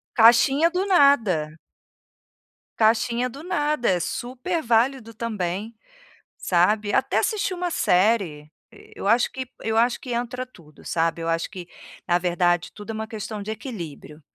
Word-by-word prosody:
Caixinha 270 +7 +5
do 370 +3 -1
nada. 225 - +3 1.2
Caixinha 235 +2 +2
do 280 +6 -11
nada, 300 -7 0
é 180 -2 +2
super 255 - -3
válido 235 -1 +1
também, 215 -1 -4 0.6
sabe, 205 +4 +1
até - - +2
assistir 405 -4 -1
uma 355 0 -2
série, 180 - +1 0.2
e - - -17
eu - - -4
acho 235 +3 +3
que 260 -1 -6
eu 225 0 -1
acho 240 +1 +2
que 250 - -7
entra 245 +2 -3
tudo, 160 - -19
sabe. 165 0 -1
Eu 165 - -2
acho 165 0 -1
que, 180 -4 -9 0.4
na 175 0 +3
verdade, 175 -1 0
tudo 210 +1 -11
é - - -5
uma 220 0 -4
questão 215 -1 -6
de 210 - -7
equilíbrio. 170 - -8
225 Hz, 150 wpm, -24 LUFS, 180-255 Hz, 1.2 s, Caixinha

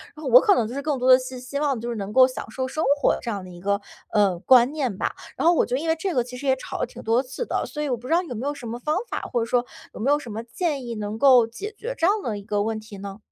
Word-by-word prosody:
然 305 - -11
后 - - -6
我 - - +9
可 410 -5 +4
能 230 - +1
就 235 - -7
是 280 - -3
更 290 -1 -1
多 255 +1 +3
地 255 - +8
希 255 0 -7
希 255 +3 -5
望 285 -3 +1
就 240 - -4
是 235 - -3
能 200 0 -5
够 260 +1 +8
享 255 - -7
受 260 +3 -2
生 310 +4 -3 0.2
活 - - +4
的 - - -4
这 240 - -5
样 200 -3 -4
的 185 - -10
一 175 - -11
个， 200 +2 0 0.3
呃， 200 -5 +3
观 250 +5 +5
念 265 -10 -2
吧。 - - -1 0.2
然 - - -1
后 345 - +7
我 - - +3
就 250 - -2
因 325 +3 -3
为 320 - +3
这 380 0 -1
个 245 - +2
其 250 +1 -9
实 280 +2 -5
也 265 - +4
吵 260 - -7
了 - - +1
挺 245 - -12
多 230 +3 +2
次 265 - -5
的， - - -1
所 300 - -4
以 295 - -2
我 250 - 0
不 245 +2 -10
知 325 - +1
道 345 - +4
有 330 - -6
没 250 +6 -3
有 290 - -1
什 280 -4 -10
么 235 +2 -5
方 300 +5 -1
法， - - -2
或 240 - +2
者 - - 0
说， 240 +1 +1 0.3
有 - - -9
没 245 - 0
有 290 - +4
什 245 -6 -9
么 215 +2 -4
建 280 +1 -2
议， 235 - -5
能 210 0 -4
够 255 -2 +6
解 410 - -7
决 485 +3 -4
这 330 - +2
样 415 +2 +2
的 215 -3 -2
一 200 - -9
个 205 0 -1
问 220 0 -2
题 215 -1 -11
呢？ 200 0 -7
250 Hz, 375 characters per minute, -24 LUFS, 225-290 Hz, 0.3 s, 我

